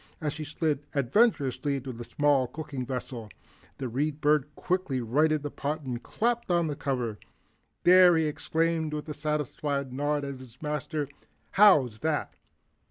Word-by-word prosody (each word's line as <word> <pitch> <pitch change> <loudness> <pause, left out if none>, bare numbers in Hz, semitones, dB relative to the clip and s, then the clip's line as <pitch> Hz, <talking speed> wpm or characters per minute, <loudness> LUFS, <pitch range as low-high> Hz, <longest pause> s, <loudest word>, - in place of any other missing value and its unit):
As 150 -3 -2
she 155 - -5
slid 150 0 -1 0.2
adventurously 140 - +2
into 135 -1 -5
the 120 +1 -7
small 140 0 +2
cooking 140 -3 -6
vessel, 125 -3 -5 0.5
the 130 - -3
Read 145 +5 -1
Bird 150 -1 +2
quickly 180 -8 -1
righted 150 +6 +2
the 145 - -4
pot 150 +3 -3
and 125 -4 -4
clapped 235 0 -1
on 175 -1 +3
the 150 -2 -2
cover. 125 -7 -2 0.6
"There," 180 -1 +8
he 160 - +2
exclaimed 160 +1 0
with 150 - -5
a - - -3
satisfied 145 -2 -2
nod 145 +1 0
at 140 -2 -6
his 125 -2 -13
Master, 150 0 -2 0.4
"how's 150 - +5
that?" 155 +2 -1
145 Hz, 155 wpm, -28 LUFS, 130-155 Hz, 0.6 s, There